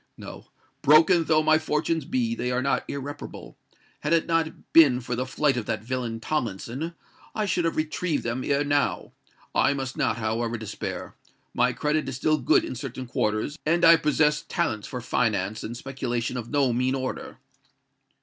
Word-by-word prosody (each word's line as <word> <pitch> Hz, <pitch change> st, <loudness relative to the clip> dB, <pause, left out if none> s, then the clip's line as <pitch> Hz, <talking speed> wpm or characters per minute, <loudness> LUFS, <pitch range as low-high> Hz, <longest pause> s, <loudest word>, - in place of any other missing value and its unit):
No—broken 165 Hz, +3 st, +2 dB
though 155 Hz, -1 st, +3 dB
my 155 Hz, 0 st, +4 dB
fortunes 155 Hz, 0 st, -1 dB
be, 120 Hz, -4 st, 0 dB
they 120 Hz, +1 st, -2 dB
are 125 Hz, +1 st, 0 dB
not 140 Hz, -, +1 dB
irreparable. 140 Hz, +1 st, -7 dB, 0.4 s
Had 150 Hz, +2 st, 0 dB
it 165 Hz, -, +3 dB
not 165 Hz, -1 st, -2 dB
been 140 Hz, -7 st, +7 dB
for 125 Hz, 0 st, -4 dB
the 130 Hz, +2 st, -2 dB
flight 140 Hz, +1 st, +1 dB
of 120 Hz, -, -3 dB
that 110 Hz, -2 st, -2 dB
villain 120 Hz, -2 st, -3 dB
Tomlinson, 130 Hz, -, -3 dB, 0.4 s
I 215 Hz, -, 0 dB
should 180 Hz, -3 st, 0 dB
have 165 Hz, -, 0 dB
retrieved 155 Hz, +1 st, -1 dB
them 120 Hz, +2 st, -2 dB
ere 140 Hz, +1 st, +1 dB
now. 145 Hz, 0 st, 0 dB, 0.4 s
I 140 Hz, -, +3 dB
must 135 Hz, -1 st, -4 dB
not, -, -, +1 dB
however, 115 Hz, +1 st, -1 dB
despair: 110 Hz, -2 st, -6 dB, 0.4 s
my -, -, +2 dB
credit 150 Hz, -1 st, -1 dB
is 135 Hz, -, -5 dB
still 155 Hz, +4 st, +1 dB
good -, -, +3 dB
in -, -, -5 dB
certain 130 Hz, 0 st, -6 dB
quarters; 115 Hz, +5 st, -1 dB
and 170 Hz, +2 st, +3 dB
I 165 Hz, 0 st, +9 dB
possess 150 Hz, -1 st, +2 dB
talents 110 Hz, -12 st, -1 dB
for 125 Hz, -, -5 dB
finance 110 Hz, -4 st, -1 dB
and 120 Hz, +2 st, -5 dB
speculation 125 Hz, -2 st, -3 dB
of 120 Hz, -2 st, -5 dB
no 140 Hz, -4 st, +2 dB
mean 130 Hz, +2 st, +1 dB
order." 130 Hz, -1 st, -5 dB
135 Hz, 170 wpm, -26 LUFS, 120-155 Hz, 0.4 s, I